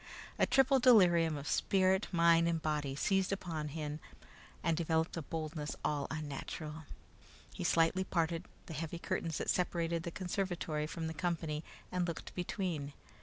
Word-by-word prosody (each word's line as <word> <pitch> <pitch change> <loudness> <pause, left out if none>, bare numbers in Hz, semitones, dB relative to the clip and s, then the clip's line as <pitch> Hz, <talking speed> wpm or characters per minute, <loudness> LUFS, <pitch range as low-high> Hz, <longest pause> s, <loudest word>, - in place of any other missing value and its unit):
A - - +4
triple 270 0 +5
delirium 175 - +6
of 140 0 -6
spirit, 190 +4 +2
mind, 170 -1 +5
and 165 -1 +1
body 150 -3 -1
seized 195 +5 +1
upon 165 -6 -3
him 150 0 -4 0.6
and 165 -1 +2
developed 160 0 0
a 165 - -2
boldness 155 -1 -4
all 145 -2 0
unnatural. 155 +1 -5 0.7
He - - -5
slightly 165 +3 +3
parted 165 -1 -1 0.2
the 165 - -7
heavy 165 +2 -4
curtains 165 -1 -2
that - - +1
separated 170 -2 0
the 170 - -4
conservatory 175 -4 -2
from 165 +1 -4
the 160 - -3
company 160 -2 -2 0.3
and 180 -1 0
looked 170 - -5
between. 175 -6 -3
165 Hz, 150 wpm, -34 LUFS, 155-180 Hz, 0.7 s, delirium